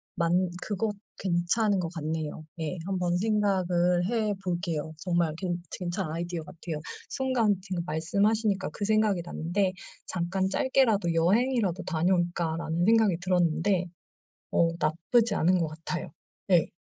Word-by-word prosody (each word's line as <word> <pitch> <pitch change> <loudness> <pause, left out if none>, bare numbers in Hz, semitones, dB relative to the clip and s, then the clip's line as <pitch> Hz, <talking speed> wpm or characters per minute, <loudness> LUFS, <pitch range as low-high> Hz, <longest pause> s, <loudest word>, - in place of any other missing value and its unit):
만 175 +1 +2
그것 210 0 -1 0.2
괜찮은 195 +3 +1
것 165 -2 -2
같네요. 155 -1 -3 0.2
예 160 +3 -3
한번 180 -2 0
생각을 180 -4 +2
해 215 -1 0
볼게요. 170 -4 -2
정말 170 -2 0
괜 175 -2 -2 0.2
괜찮은 175 -2 -3
아이디어 170 +1 -3
같아요. 160 -1 -6 0.3
순간 250 -6 +1
지금 185 -3 -3
말씀하시니까 200 +4 +1
그 205 - -5
생각이 215 -4 +2
났는데 185 +3 -1 0.3
잠깐 185 +2 -1
'짧게라도 220 -7 +2
여행이라도 195 +2 +2
다녀올까?'라는 170 -1 0
생각이 220 -5 +4
들었는데 180 +1 +2 0.7
어 165 0 +4
나쁘지 200 +8 +2
않은 180 +3 +3
것 165 - +1
같아요. 165 +3 -5 0.4
네. 175 -4 +3
180 Hz, 305 characters per minute, -28 LUFS, 170-205 Hz, 0.7 s, 생각이